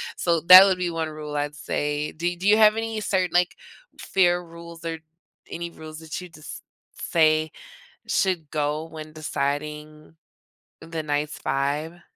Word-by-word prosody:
so 170 Hz, -2 st, +1 dB
that 185 Hz, +3 st, +11 dB
would 190 Hz, -2 st, +2 dB
be 180 Hz, -1 st, -1 dB
one 165 Hz, -1 st, -3 dB
rule, 150 Hz, -1 st, -7 dB
I'd 145 Hz, 0 st, -2 dB
say. 150 Hz, +1 st, -3 dB
Do 175 Hz, +2 st, -2 dB
do 185 Hz, +3 st, -3 dB
you 210 Hz, -, +7 dB
have 215 Hz, 0 st, +5 dB
any 225 Hz, -1 st, -3 dB
certain 185 Hz, -3 st, 0 dB
like, 175 Hz, 0 st, +2 dB, 0.4 s
fair 180 Hz, -2 st, +2 dB
rules, 170 Hz, -1 st, -12 dB
or 165 Hz, -1 st, -4 dB, 0.5 s
any 170 Hz, 0 st, -5 dB
rules 155 Hz, -1 st, -11 dB
that 160 Hz, +2 st, -6 dB
you 180 Hz, -, -10 dB
just 155 Hz, -2 st, -11 dB, 0.5 s
say 155 Hz, -1 st, +3 dB, 0.6 s
should 175 Hz, -6 st, 0 dB
go 150 Hz, +1 st, -1 dB
when 155 Hz, -1 st, -10 dB
deciding 150 Hz, +1 st, -4 dB, 0.7 s
the 165 Hz, -1 st, -5 dB
night's 150 Hz, 0 st, -2 dB
vibe? 145 Hz, +5 st, -2 dB
160 Hz, 155 wpm, -24 LUFS, 150-175 Hz, 0.7 s, that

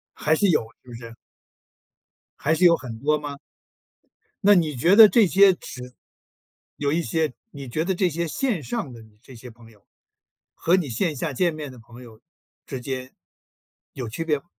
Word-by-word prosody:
还 155 Hz, -, +1 dB
是 200 Hz, +5 st, +2 dB
有， 155 Hz, -, +2 dB, 0.2 s
是 -, -, -23 dB
不 120 Hz, -, -10 dB
是？ 115 Hz, -1 st, -10 dB, 1.2 s
还 155 Hz, -, +1 dB
是 180 Hz, -, +1 dB
有 170 Hz, -1 st, +6 dB
很 115 Hz, -7 st, -9 dB
多 150 Hz, +4 st, +1 dB
吗？ 145 Hz, -1 st, -7 dB, 1.1 s
那 205 Hz, +1 st, +6 dB
你 160 Hz, -5 st, +1 dB
觉 170 Hz, +11 st, +3 dB
得 220 Hz, -1 st, +11 dB
这 225 Hz, -1 st, +4 dB
些 195 Hz, +2 st, +5 dB
指 125 Hz, -7 st, -10 dB, 0.8 s
有 145 Hz, -1 st, -1 dB
一 170 Hz, +2 st, 0 dB
些， 160 Hz, -5 st, -1 dB, 0.2 s
你 140 Hz, -3 st, -9 dB
觉 155 Hz, +7 st, -2 dB
得 190 Hz, +2 st, -1 dB
这 185 Hz, +1 st, +1 dB
些 170 Hz, +1 st, -3 dB
线 200 Hz, -, -2 dB
上 200 Hz, -, -4 dB
的 115 Hz, -1 st, -12 dB
你 110 Hz, -1 st, -21 dB
这 130 Hz, -1 st, -14 dB
些 125 Hz, +2 st, -11 dB
朋 115 Hz, 0 st, -17 dB
友， 105 Hz, -3 st, -25 dB, 0.7 s
和 175 Hz, +3 st, +2 dB
你 175 Hz, -6 st, -2 dB
线 150 Hz, -, -1 dB
下 145 Hz, +2 st, -4 dB
见 170 Hz, +5 st, 0 dB
面 150 Hz, -2 st, -7 dB
的 130 Hz, -, -13 dB
朋 120 Hz, +2 st, -15 dB
友 110 Hz, -3 st, -15 dB, 0.4 s
之 135 Hz, -3 st, -7 dB
间， 130 Hz, 0 st, -6 dB, 0.8 s
有 125 Hz, -3 st, -6 dB
区 135 Hz, +9 st, -5 dB
别 150 Hz, -3 st, 0 dB
吗？ -, -, -23 dB
145 Hz, 205 characters per minute, -23 LUFS, 125-170 Hz, 1.2 s, 得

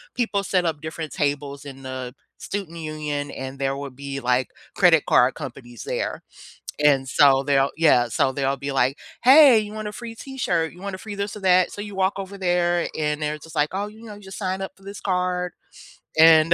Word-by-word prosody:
people 225 Hz, -5 st, 0 dB
set 185 Hz, -1 st, +1 dB
up 155 Hz, -3 st, -2 dB
different 160 Hz, -1 st, -6 dB
tables 145 Hz, 0 st, -2 dB
in 135 Hz, -1 st, -9 dB
the 130 Hz, -1 st, -6 dB, 0.2 s
student 190 Hz, -5 st, -5 dB
union 150 Hz, -2 st, -4 dB
and 135 Hz, +1 st, -7 dB
there 135 Hz, 0 st, -1 dB
would 140 Hz, -2 st, -7 dB
be, 140 Hz, 0 st, -5 dB
like, 125 Hz, 0 st, +1 dB, 0.3 s
credit 170 Hz, -5 st, +5 dB
card 125 Hz, +2 st, +4 dB
companies 120 Hz, -5 st, -8 dB
there, -, -, -3 dB, 0.6 s
and 135 Hz, -3 st, +4 dB
so 135 Hz, -1 st, +5 dB
they'll 140 Hz, -1 st, +2 dB
yeah, 145 Hz, -7 st, +4 dB
so 130 Hz, +3 st, +1 dB
they'll 135 Hz, 0 st, 0 dB
be 140 Hz, +1 st, -4 dB
like, 135 Hz, 0 st, +1 dB, 0.3 s
"Hey, 265 Hz, -2 st, +8 dB
you 210 Hz, 0 st, -5 dB
want 215 Hz, -1 st, -5 dB
a -, -, -4 dB
free 230 Hz, +1 st, -8 dB
t-shirt? 190 Hz, -, -2 dB
You 175 Hz, -, -15 dB
want 200 Hz, -1 st, -4 dB
a -, -, -8 dB
free 210 Hz, +2 st, -8 dB
this 200 Hz, +1 st, -3 dB
or -, -, -7 dB
that?" 185 Hz, -1 st, +4 dB
So 205 Hz, -, -7 dB
you 205 Hz, 0 st, -7 dB
walk 190 Hz, 0 st, +1 dB
over 195 Hz, 0 st, -6 dB
there 175 Hz, -2 st, +1 dB
and 150 Hz, -1 st, -1 dB
they're 150 Hz, 0 st, -1 dB
just 160 Hz, +1 st, -13 dB
like, 150 Hz, 0 st, +2 dB
"Oh, 200 Hz, +2 st, -2 dB
you 215 Hz, +2 st, -13 dB
know, 215 Hz, -2 st, -9 dB
you 205 Hz, -, -14 dB
just 190 Hz, -1 st, -10 dB
sign 190 Hz, -1 st, -2 dB
up 190 Hz, -, -4 dB
for 195 Hz, -, -21 dB
this 200 Hz, +1 st, -9 dB
card 180 Hz, -2 st, -1 dB, 0.7 s
and 160 Hz, 0 st, +7 dB
160 Hz, 215 wpm, -23 LUFS, 140-195 Hz, 0.7 s, Hey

